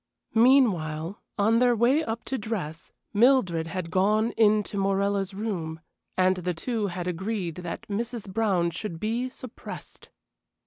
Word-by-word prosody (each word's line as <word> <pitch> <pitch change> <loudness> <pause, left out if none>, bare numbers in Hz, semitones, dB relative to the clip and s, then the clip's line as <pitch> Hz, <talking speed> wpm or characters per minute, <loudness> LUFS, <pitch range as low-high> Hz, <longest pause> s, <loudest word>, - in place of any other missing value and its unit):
Meanwhile, 200 - +3 0.2
on 220 +3 +4
their 245 -1 +4
way 250 +8 +3
up 225 -2 -4
to 265 - -2
dress, 185 -8 -5 0.2
Mildred 205 -8 +4
had 165 -1 -4
gone 215 +5 +2
in 215 -1 +4
to 205 - -8
Morella's 195 0 0
room, 175 -7 -3 0.4
and 185 0 +3
the 180 -1 -2
two 220 +3 -1
had 180 -1 -4
agreed 180 -1 -3
that 175 -2 -5
Mrs. 230 +1 -3
Brown 190 -4 +1
should 170 -1 -5
be 235 +5 -1
suppressed. 255 -2 -10
200 Hz, 140 wpm, -27 LUFS, 180-225 Hz, 0.4 s, on